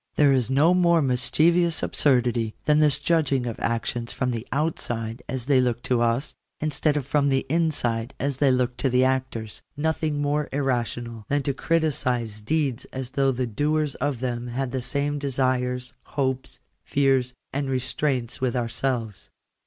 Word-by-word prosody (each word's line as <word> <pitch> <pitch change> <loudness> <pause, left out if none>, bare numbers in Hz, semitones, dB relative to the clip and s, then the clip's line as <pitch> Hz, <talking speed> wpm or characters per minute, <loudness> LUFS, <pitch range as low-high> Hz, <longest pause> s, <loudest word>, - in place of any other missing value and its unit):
There 145 -2 +5
is 130 -2 +1
no 145 +6 +4
more 170 -2 +4
(mischievous 160 +5 +2
absurdity 120 -5 +1
than 150 0 +4
this 150 -3 +4
judging 145 -5 +1
of 115 -2 -4
actions 115 0 -2
from 125 0 -1
the 115 -1 -4
\outside 120 -6 -2
as 125 -2 -3
they 135 -2 +4
look 120 -1 -1
to 125 -2 +1
us, 120 +3 0 0.3
instead 150 0 +1
of 140 - -2
from 140 0 +2
the 135 -1 +1
inside 135 -7 0
as 140 -1 -1
they 140 -1 +3
look 125 -1 0
to 135 - +1
the 125 +1 +3
actors; 130 -5 -1 0.2
nothing 155 -1 0
more 145 0 0
irrational 120 -4 -2
than 145 0 +1
to 140 - 0
criticize 130 -9 0
deeds 140 0 -1
as 130 -1 -6
though 135 -1 +2
the 125 0 -1
doers 150 +5 0
of 135 -2 -2
them 120 -1 -2
had 125 +1 -3
the 130 0 -2
same 145 +3 -1
desires, 130 -2 -1 0.2
hopes, 130 -2 -1 0.2
fears, 135 -3 +1 0.2
and 140 0 -1
restraints 130 -1 -1
with 130 -2 0
ourselves. 115 -3 -2
130 Hz, 160 wpm, -25 LUFS, 120-145 Hz, 0.3 s, There